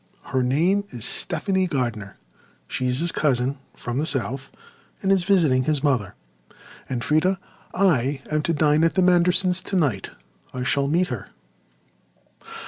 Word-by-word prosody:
Her 130 Hz, -1 st, -1 dB
name 165 Hz, +11 st, +2 dB
is 120 Hz, -4 st, -6 dB
Stephanie 190 Hz, -2 st, 0 dB
Gardiner; 115 Hz, -, -3 dB, 0.5 s
she 130 Hz, -, -2 dB
is 125 Hz, +3 st, 0 dB
his 170 Hz, 0 st, +3 dB
cousin 135 Hz, -1 st, 0 dB, 0.2 s
from 120 Hz, +2 st, -4 dB
the 155 Hz, -, +1 dB
south 135 Hz, 0 st, -1 dB, 0.5 s
and 195 Hz, -, +2 dB
is 190 Hz, -3 st, +2 dB
visiting 155 Hz, -10 st, +3 dB
his 150 Hz, -1 st, 0 dB
mother. 125 Hz, -10 st, 0 dB, 0.7 s
And, 120 Hz, -2 st, -3 dB
Freda, 175 Hz, +5 st, +2 dB, 0.3 s
I 140 Hz, -8 st, +1 dB
am 155 Hz, 0 st, +1 dB
to 170 Hz, -, 0 dB
dine 150 Hz, +1 st, +3 dB
at 165 Hz, -, +2 dB
the 185 Hz, -, +3 dB
Mandersons' 180 Hz, +1 st, +3 dB
tonight. 145 Hz, -, -1 dB, 0.5 s
I 125 Hz, -, -3 dB
shall 140 Hz, +1 st, +1 dB
meet 175 Hz, +5 st, +1 dB
her." 120 Hz, -6 st, -5 dB
150 Hz, 145 wpm, -23 LUFS, 130-180 Hz, 0.7 s, his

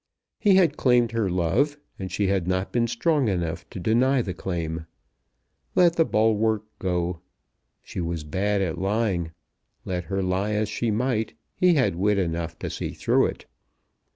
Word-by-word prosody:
He 200 Hz, -3 st, +5 dB
had 170 Hz, -6 st, +4 dB
claimed 120 Hz, -3 st, +3 dB
her 115 Hz, -4 st, 0 dB
love, 90 Hz, -, +1 dB, 0.2 s
and 95 Hz, -2 st, -5 dB
she 100 Hz, +3 st, 0 dB
had 95 Hz, -2 st, 0 dB
not 95 Hz, +1 st, -1 dB
been 120 Hz, -1 st, +1 dB
strong 135 Hz, +3 st, +1 dB
enough 85 Hz, -5 st, -2 dB
to -, -, -7 dB
deny 120 Hz, +7 st, +2 dB
the 95 Hz, -, -4 dB
claim. 85 Hz, -3 st, -4 dB, 0.9 s
Let 170 Hz, -2 st, +5 dB
the 165 Hz, -, +4 dB
bulwark 110 Hz, -2 st, +2 dB, 0.2 s
go. 90 Hz, -2 st, -1 dB, 0.6 s
She -, -, -5 dB
was 85 Hz, -2 st, -3 dB
bad 95 Hz, +6 st, 0 dB
at 85 Hz, -2 st, -3 dB
lying. 95 Hz, -4 st, 0 dB, 0.6 s
Let 90 Hz, -2 st, -3 dB
her 95 Hz, +1 st, -2 dB
lie 95 Hz, +3 st, 0 dB
as 105 Hz, 0 st, 0 dB
she 115 Hz, +2 st, -1 dB
might, 110 Hz, 0 st, 0 dB, 0.2 s
he 180 Hz, -2 st, +3 dB
had 130 Hz, -, +2 dB
wit 100 Hz, +2 st, +2 dB
enough 85 Hz, -3 st, -2 dB
to -, -, -4 dB
see -, -, -4 dB
through -, -, +2 dB
it. -, -, -7 dB
100 Hz, 165 wpm, -25 LUFS, 90-115 Hz, 0.9 s, He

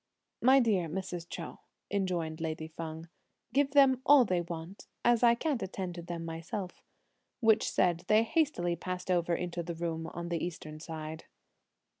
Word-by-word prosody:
"My 265 Hz, +2 st, +7 dB
dear 205 Hz, -9 st, +2 dB
Mrs. 175 Hz, -1 st, -5 dB
Chou," -, -, -6 dB, 0.3 s
enjoined 175 Hz, -5 st, -1 dB
lady 160 Hz, -1 st, -3 dB
Feng, 160 Hz, 0 st, -7 dB, 0.5 s
"give 280 Hz, 0 st, +3 dB
them 270 Hz, -3 st, +6 dB
all 280 Hz, -3 st, +7 dB
they 180 Hz, -4 st, +1 dB
want, 170 Hz, +2 st, -7 dB, 0.2 s
as 240 Hz, -1 st, +4 dB
I 235 Hz, -1 st, +6 dB
can't 275 Hz, -1 st, -1 dB
attend 185 Hz, -1 st, -4 dB
to 170 Hz, -, -7 dB
them 170 Hz, -1 st, -5 dB
myself;" 170 Hz, +4 st, -5 dB, 0.6 s
which 220 Hz, -3 st, +4 dB
said, 175 Hz, -1 st, +1 dB
they 215 Hz, +1 st, +5 dB
hastily 230 Hz, -, +1 dB
passed 180 Hz, +2 st, -4 dB
over 175 Hz, -1 st, +2 dB
into 175 Hz, 0 st, -3 dB
the 170 Hz, 0 st, -5 dB
room 165 Hz, -1 st, -3 dB
on 170 Hz, 0 st, -6 dB
the 170 Hz, -2 st, -1 dB
eastern 155 Hz, -3 st, -6 dB
side. 160 Hz, -1 st, -7 dB
175 Hz, 160 wpm, -31 LUFS, 165-215 Hz, 0.6 s, My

